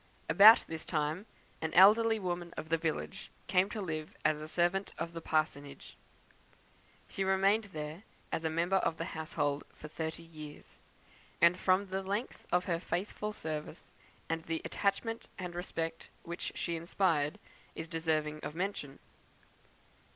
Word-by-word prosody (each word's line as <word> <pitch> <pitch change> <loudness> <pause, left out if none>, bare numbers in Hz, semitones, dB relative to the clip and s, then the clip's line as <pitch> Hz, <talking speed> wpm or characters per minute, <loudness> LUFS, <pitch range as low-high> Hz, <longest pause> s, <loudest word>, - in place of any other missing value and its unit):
About 215 +3 +9
this 160 -1 -3
time, 155 +5 -1 0.3
an 160 0 -1
elderly 220 +4 +7
woman 175 -3 -3
of 155 - -5
the 165 - +3
village 165 +4 -3 0.2
came 185 +1 +3
to 215 - -4
live 155 -5 -4
as 155 0 +1
servant 175 +3 +1
at 165 +1 -4
the 165 - -5
parsonage. 145 -3 -2 1.1
She 195 - -2
remained 195 +3 +3
there, 155 -2 -6 0.3
as 160 - -1
a 160 - +1
member 170 +4 +2
of 165 -3 0
the 165 - -3
household, 145 -2 -1
for 155 - -9
thirty 160 +1 -4
years; 155 -3 -11 0.6
and 170 +1 +6
from 185 +2 +2
the 190 0 -3
length 200 +6 -4
of 180 +1 +2
her 170 -2 0
faithful 200 +4 -3
service, 155 -4 -6 0.3
and 165 0 -1
the 165 -1 -2
attachment 225 +3 -1
and 180 -2 -5
respect 165 -2 -4
which 170 +1 -4
she 170 - -2
inspired, 165 -3 +1 0.4
is 160 - -5
deserving 155 -2 -1
of 150 - -6
mention. 175 -7 -3
170 Hz, 145 wpm, -33 LUFS, 155-190 Hz, 1.1 s, About